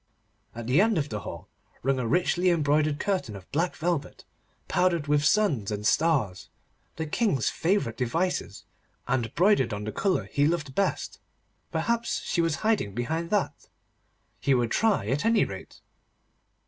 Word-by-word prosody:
At 120 Hz, -1 st, -6 dB
the 130 Hz, +9 st, +4 dB
end 220 Hz, -2 st, +2 dB
of 145 Hz, -2 st, -1 dB
the 105 Hz, -, -3 dB
hall 95 Hz, -, -8 dB, 0.4 s
hung 135 Hz, -1 st, +2 dB
a 120 Hz, -, -1 dB
richly 180 Hz, +5 st, +2 dB
embroidered 150 Hz, -2 st, +2 dB
curtain 140 Hz, -, -1 dB
of 95 Hz, -2 st, -12 dB
black 170 Hz, +4 st, 0 dB
velvet, 165 Hz, -4 st, -3 dB, 0.4 s
powdered 175 Hz, -4 st, +1 dB
with 145 Hz, 0 st, +2 dB
suns 145 Hz, -, +2 dB
and 105 Hz, 0 st, -4 dB
stars, 135 Hz, -, +1 dB, 0.5 s
the 160 Hz, -, -3 dB
King's 150 Hz, -, +1 dB
favourite 165 Hz, -, 0 dB
devices, 165 Hz, +9 st, -2 dB, 0.4 s
and 120 Hz, -3 st, 0 dB
broidered 170 Hz, -, +3 dB
on 100 Hz, 0 st, -4 dB
the 110 Hz, -, -4 dB
colour 195 Hz, -, 0 dB
he 145 Hz, 0 st, +1 dB
loved 155 Hz, -5 st, -2 dB
best. 200 Hz, +5 st, -1 dB, 0.5 s
Perhaps 235 Hz, 0 st, -1 dB
she 170 Hz, -, 0 dB
was 165 Hz, -2 st, +1 dB
hiding 205 Hz, -, +1 dB
behind 160 Hz, +8 st, -2 dB
that? 205 Hz, -1 st, -1 dB, 0.7 s
He 135 Hz, -, +2 dB
would 120 Hz, -2 st, 0 dB
try 220 Hz, -, +2 dB
at 135 Hz, +6 st, 0 dB
any 225 Hz, -1 st, +3 dB
rate. 95 Hz, -1 st, -9 dB
150 Hz, 155 wpm, -27 LUFS, 120-180 Hz, 0.7 s, the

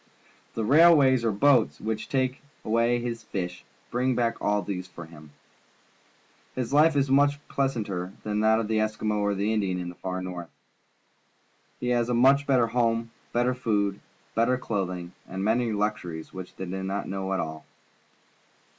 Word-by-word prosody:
The 115 Hz, -, -1 dB
railways 140 Hz, -2 st, +6 dB
or 115 Hz, -, +2 dB
boats, 125 Hz, +2 st, +3 dB
which 110 Hz, 0 st, -3 dB
take 130 Hz, -1 st, 0 dB, 0.2 s
away 115 Hz, +2 st, +2 dB
his 120 Hz, -1 st, -4 dB
fish, 90 Hz, -5 st, -5 dB, 0.3 s
bring 125 Hz, +1 st, +1 dB
back 115 Hz, -1 st, +1 dB
all 105 Hz, 0 st, +1 dB
these 90 Hz, -2 st, -4 dB
things 90 Hz, -, -29 dB
for 85 Hz, -, -7 dB
him. 80 Hz, -2 st, -14 dB, 1.3 s
His 125 Hz, -1 st, -3 dB
fife 150 Hz, +2 st, +5 dB
is 140 Hz, -1 st, +1 dB
much 145 Hz, +1 st, +4 dB
pleasanter 105 Hz, -10 st, -2 dB
than 105 Hz, 0 st, -1 dB
that 110 Hz, +1 st, +4 dB
of 115 Hz, -, -2 dB
the 110 Hz, 0 st, 0 dB
Eskimo 110 Hz, 0 st, -1 dB
or 105 Hz, 0 st, +1 dB
of -, -, -4 dB
the 105 Hz, +3 st, 0 dB
Indian 95 Hz, -4 st, 0 dB
in 90 Hz, -1 st, -4 dB
the -, -, -8 dB
far 95 Hz, 0 st, -3 dB
North. 90 Hz, -2 st, -6 dB, 1.3 s
He 125 Hz, -, -2 dB
has 120 Hz, -1 st, +1 dB
a 120 Hz, -, +1 dB, 0.3 s
better 130 Hz, -4 st, +4 dB
home, 115 Hz, -1 st, 0 dB, 0.2 s
better 120 Hz, +1 st, +1 dB
food, 105 Hz, -5 st, 0 dB, 0.3 s
better 120 Hz, +3 st, +2 dB
clothing, 90 Hz, -7 st, -3 dB, 0.2 s
and 95 Hz, +1 st, -4 dB
many 115 Hz, +2 st, +1 dB
luxuries 100 Hz, -6 st, -3 dB
which 95 Hz, -1 st, -8 dB
they 95 Hz, -, -5 dB
do 95 Hz, +1 st, -4 dB
not 95 Hz, +1 st, -3 dB
know 95 Hz, 0 st, -3 dB
at 95 Hz, -, 0 dB
all. 80 Hz, 0 st, -4 dB
110 Hz, 170 wpm, -27 LUFS, 95-125 Hz, 1.3 s, railways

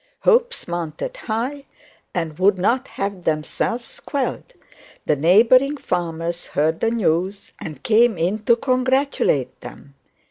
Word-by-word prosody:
Hopes 485 Hz, 0 st, +2 dB
mounted 175 Hz, -, -4 dB
high 270 Hz, -, -4 dB, 0.5 s
and 165 Hz, -3 st, -4 dB
would 190 Hz, +1 st, +4 dB
not 240 Hz, +8 st, +1 dB
have 195 Hz, -2 st, -4 dB
themselves 165 Hz, +10 st, -2 dB
quelled. 280 Hz, -, -3 dB, 0.5 s
The 150 Hz, -, +2 dB
neighbouring 230 Hz, -, +4 dB
farmers 170 Hz, -7 st, -3 dB
heard 160 Hz, +3 st, 0 dB
this 225 Hz, -, +1 dB
news, 195 Hz, -2 st, -1 dB
and 150 Hz, -4 st, -8 dB
came 230 Hz, -1 st, +4 dB
in 180 Hz, +6 st, 0 dB
to 235 Hz, -, +5 dB
congratulate 255 Hz, -, 0 dB
them. 140 Hz, -, -11 dB
200 Hz, 120 wpm, -21 LUFS, 165-255 Hz, 0.5 s, to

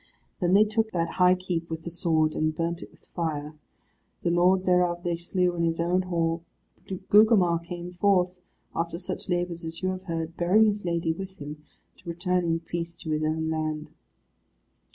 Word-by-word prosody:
Then 180 Hz, -1 st, +3 dB
they 205 Hz, -, +8 dB
took 220 Hz, +1 st, 0 dB
that 165 Hz, -1 st, 0 dB
high 180 Hz, 0 st, +7 dB
keep 180 Hz, -3 st, -3 dB
with 160 Hz, 0 st, -5 dB
the 170 Hz, -, -5 dB
sword, 160 Hz, -2 st, +1 dB
and 155 Hz, 0 st, 0 dB
burnt 170 Hz, +1 st, -2 dB
it -, -, -9 dB
with -, -, -25 dB
fire. 155 Hz, -3 st, -2 dB, 0.7 s
The 170 Hz, -, +2 dB
lord 180 Hz, +2 st, +3 dB
thereof 180 Hz, -1 st, +2 dB
they 175 Hz, -1 st, 0 dB
slew 180 Hz, +1 st, 0 dB
in 170 Hz, -, 0 dB
his 165 Hz, 0 st, 0 dB
own 175 Hz, +2 st, +2 dB
hall; 170 Hz, -2 st, -1 dB, 0.5 s
but 190 Hz, -2 st, -6 dB
Gugemar 205 Hz, -6 st, +6 dB
came 175 Hz, +1 st, -7 dB
forth, 180 Hz, -1 st, +3 dB, 0.4 s
after 170 Hz, 0 st, -2 dB
such 180 Hz, +2 st, -5 dB
labours 175 Hz, -1 st, -1 dB
as 165 Hz, +2 st, -5 dB
you 185 Hz, -, +2 dB
have 185 Hz, 0 st, -4 dB
heard, 165 Hz, -1 st, -4 dB
bearing 190 Hz, +6 st, +5 dB
his 205 Hz, -2 st, 0 dB
lady 170 Hz, -1 st, 0 dB
with 190 Hz, +2 st, -8 dB
him, 150 Hz, +1 st, -8 dB, 0.4 s
to -, -, -9 dB
return 180 Hz, +1 st, 0 dB
in 165 Hz, 0 st, 0 dB
peace 170 Hz, 0 st, -4 dB
to 160 Hz, -1 st, -6 dB
his 155 Hz, 0 st, 0 dB
own 160 Hz, +1 st, 0 dB
land. 155 Hz, -1 st, -2 dB
170 Hz, 190 wpm, -27 LUFS, 165-180 Hz, 0.7 s, they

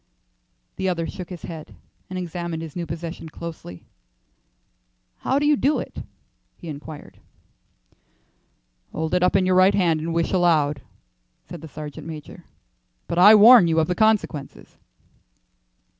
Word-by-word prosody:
The 190 Hz, -, -1 dB
other 170 Hz, -2 st, -2 dB
shook 180 Hz, +1 st, -8 dB
his 180 Hz, -4 st, -9 dB
head 160 Hz, -2 st, -9 dB, 0.3 s
and 185 Hz, -, -5 dB
examined 170 Hz, -2 st, -5 dB
his 160 Hz, -3 st, -9 dB
new 170 Hz, -2 st, -4 dB
possession 165 Hz, +1 st, -7 dB
closely. 155 Hz, -, -9 dB, 1.3 s
"How 265 Hz, -, -1 dB
do 290 Hz, -, +1 dB
you 295 Hz, 0 st, +4 dB
do 285 Hz, +3 st, +1 dB
it?" -, -, -7 dB, 0.6 s
he 170 Hz, -, -10 dB
inquired. 150 Hz, +1 st, -10 dB, 1.7 s
"Hold 160 Hz, +1 st, -3 dB
it 180 Hz, -, +2 dB
up 180 Hz, +2 st, +2 dB
in 190 Hz, -1 st, +3 dB
your 185 Hz, -, +2 dB
right 185 Hz, +2 st, +5 dB
hand 170 Hz, -5 st, +2 dB
and 165 Hz, +2 st, -4 dB
wish 165 Hz, 0 st, -1 dB
aloud," 155 Hz, -6 st, +2 dB, 0.6 s
said 175 Hz, -3 st, -10 dB
the 160 Hz, -, -9 dB
sergeant 150 Hz, 0 st, -9 dB
major, 155 Hz, -2 st, -10 dB, 0.6 s
"but 170 Hz, -, -2 dB
I 205 Hz, +4 st, +9 dB
warn 220 Hz, -2 st, +8 dB
you 165 Hz, 0 st, +2 dB
of 160 Hz, -, +2 dB
the 180 Hz, -, 0 dB
consequences." 205 Hz, -9 st, -1 dB
170 Hz, 145 wpm, -23 LUFS, 160-185 Hz, 1.7 s, I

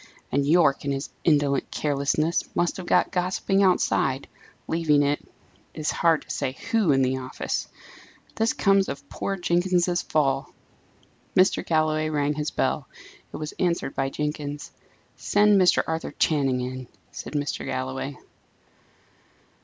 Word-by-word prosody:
and, 140 Hz, +1 st, +1 dB
Yorke, 155 Hz, -3 st, +4 dB
in 140 Hz, -, -1 dB
his 135 Hz, +1 st, -4 dB
indolent 145 Hz, -4 st, +2 dB
carelessness, 150 Hz, +3 st, 0 dB
must 175 Hz, -, 0 dB
have 185 Hz, -2 st, -7 dB
got 180 Hz, -, +3 dB
gossiping 185 Hz, +2 st, 0 dB
outside, 140 Hz, -7 st, +2 dB, 0.4 s
leaving, 155 Hz, -3 st, +2 dB
it 145 Hz, +1 st, 0 dB, 0.5 s
is 155 Hz, -1 st, -1 dB
hard 165 Hz, -2 st, +2 dB
to -, -, -26 dB
say 135 Hz, -2 st, -3 dB
who, 220 Hz, -9 st, +3 dB
in 135 Hz, -1 st, +3 dB
the 130 Hz, +1 st, 0 dB
office! 130 Hz, 0 st, -4 dB, 0.7 s
This 225 Hz, +1 st, +1 dB
comes 195 Hz, -1 st, +2 dB
of 140 Hz, 0 st, -7 dB
poor 195 Hz, -, -3 dB
Jenkins's 175 Hz, 0 st, +1 dB
fall!" 135 Hz, -3 st, 0 dB, 0.8 s
Mr. 185 Hz, +1 st, +4 dB
Galloway 155 Hz, -1 st, +1 dB
rang 145 Hz, -1 st, 0 dB
his 150 Hz, 0 st, -2 dB
bell. -, -, -1 dB, 0.4 s
It -, -, -6 dB
was 155 Hz, 0 st, -5 dB
answered 170 Hz, -6 st, 0 dB
by 135 Hz, 0 st, -1 dB
Jenkins. 150 Hz, 0 st, -4 dB, 0.5 s
"Send 205 Hz, -1 st, +4 dB
Mr. 180 Hz, -, +4 dB
Arthur 160 Hz, 0 st, -4 dB
Channing 135 Hz, -5 st, +2 dB
in," 130 Hz, 0 st, -5 dB, 0.2 s
said -, -, -8 dB
Mr. 145 Hz, -1 st, -2 dB
Galloway. 130 Hz, +1 st, -4 dB
150 Hz, 135 wpm, -25 LUFS, 140-175 Hz, 0.8 s, Yorke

